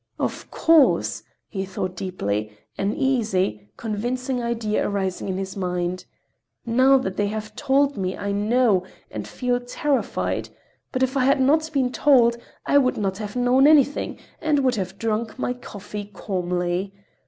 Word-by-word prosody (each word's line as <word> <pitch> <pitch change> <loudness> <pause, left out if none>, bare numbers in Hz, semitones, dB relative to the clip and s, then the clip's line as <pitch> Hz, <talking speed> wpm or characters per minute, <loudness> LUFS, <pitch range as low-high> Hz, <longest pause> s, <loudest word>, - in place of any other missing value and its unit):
"Of - - -3
course," 325 -4 +3 0.3
he 190 -2 -4
thought 185 -1 -4
deeply, 105 - -3 0.2
an 200 +2 -1
easy, 210 - 0
convincing 245 +4 -2
idea 230 -3 -1
arising 195 -1 -2
in 185 - -2
his 190 0 -4
mind. 180 -1 -2 0.6
"Now 260 +4 +5
that 190 -8 -3
they 205 - +1
have 215 0 -5
told 280 -1 +2
me, 185 -1 -2
I 200 - -3
know, 210 0 +3 0.3
and - - -5
feel 245 -1 -1
terrified, 275 +3 -1 0.4
but 260 -1 0
if 260 +1 0
I 260 -2 +2
had 275 +1 +4
not 310 +4 +3
been 265 -4 +1
told, 245 -5 +4 0.3
I 285 - +5
would 255 -2 +1
not 195 -1 -2
have 210 0 -6
known 250 +3 +4
anything 290 -2 +3 0.2
and 300 -3 +2
would 255 -1 +3
have 190 -3 -4
drunk 225 +1 -2
my 250 - -1
coffee 205 -4 -8
calmly. 180 -1 -2
220 Hz, 155 wpm, -23 LUFS, 190-260 Hz, 0.6 s, Now